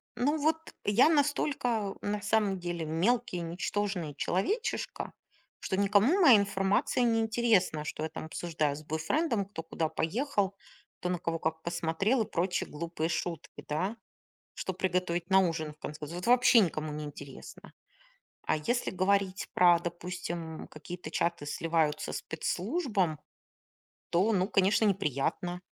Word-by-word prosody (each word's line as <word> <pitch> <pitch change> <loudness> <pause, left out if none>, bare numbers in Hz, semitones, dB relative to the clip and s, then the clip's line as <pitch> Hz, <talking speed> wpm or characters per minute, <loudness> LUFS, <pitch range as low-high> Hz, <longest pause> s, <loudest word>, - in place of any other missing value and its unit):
Ну 290 +6 +1
вот 315 +2 +3 0.3
я 230 +9 +5
настолько 275 -8 +1
на 205 0 -2
самом 205 -4 +1
деле 175 -2 -3
мелкий 185 +5 +1
ничтожный 175 -1 -2
человечишко, 390 - -2 0.5
что 190 - -2
никому 205 - +4
моя 260 -10 +9
информация 200 +4 +1
неинтересна, 225 -7 +2
что 155 - -4
я 160 - -2
там 155 - -7
обсуждаю 160 -3 -1
с 155 - -9
бойфрендом, 200 - 0
кто 190 -4 -7
куда 160 -1 -2
поехал, 200 - -1 0.4
кто 180 - -2
на 180 - -1
кого 165 0 -2
как 160 0 -2
посмотрел 175 +8 0
и - - -11
прочие 180 +2 0
глупые 165 +1 -3
шутки, 170 0 -4
да, 180 +9 -1 0.6
что 190 - -3
приготовить 180 -1 -1
на 190 - +7
ужин 165 -4 -1
в 150 - -35
конце 150 +1 -6
Вот 175 +3 -6
вообще 245 -1 +6
никому 155 -5 -1
не 150 0 -5
интересно. 145 -2 -10 0.7
А - - +1
если 240 +11 -1
говорить 190 0 +1
про, 175 -1 +6
допустим, 170 -1 -5
м, - - -11
какие-то 155 +1 -8
чаты 170 -3 -1
сливаются 160 -1 0
спецслужбам, 190 - -1 0.9
то 185 +6 +3
ну, 190 -2 +2
конечно, 205 +2 +3
неприятно. 175 - 0
180 Hz, 140 wpm, -30 LUFS, 160-210 Hz, 0.9 s, моя